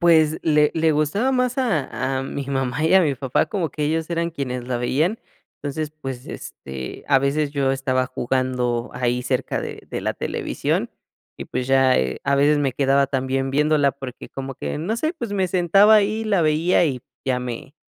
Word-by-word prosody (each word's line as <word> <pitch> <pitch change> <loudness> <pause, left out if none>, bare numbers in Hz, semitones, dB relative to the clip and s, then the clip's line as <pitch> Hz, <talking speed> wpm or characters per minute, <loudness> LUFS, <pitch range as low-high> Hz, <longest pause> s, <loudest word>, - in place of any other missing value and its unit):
Pues 160 -2 +4
le 150 -2 +3
le 160 0 +3
gustaba 155 - +1
más 250 0 0
a 150 - -1
a - - -2
mi 140 +1 -4
mamá 135 +1 -1
y 160 - +3
a 190 - +8
mi 150 -6 +1
papá, 135 -1 0
como 185 -7 -2
que 150 - -3
ellos 160 +2 -1
eran 170 0 0
quienes 125 -6 -4
la 125 -1 -1
veían, 155 - 0 0.4
entonces, 150 +1 -3
pues, 130 -2 -5
este, 65 -1 -8
a 140 -2 +5
veces 140 +2 0
yo 140 -2 +1
estaba 130 -1 0
jugando 125 -2 -1
ahí 125 0 -1
cerca 125 0 -1
de - - -7
de - - -4
la - - -1
televisión - - -2 0.5
y, - - -6
pues, 125 0 -3
ya, 135 -1 +4
eh, 65 0 -1
a 140 - +2
veces 145 +2 +4
me 140 -2 +1
quedaba 140 +1 +3
también 135 0 -1
viéndola 150 0 +3
porque, 135 -3 -9
como 135 0 -6
que, - - -4
no 190 +9 -2
sé, 310 +7 -1
pues 235 -10 -5
me 190 -2 +1
sentaba 190 +4 +5
ahí, 215 +2 +1
la 200 -5 +2
veía 160 +4 +3
y 135 -6 -1 0.2
ya 130 -1 +1
me 125 +3 -6
140 Hz, 195 wpm, -22 LUFS, 130-165 Hz, 0.5 s, a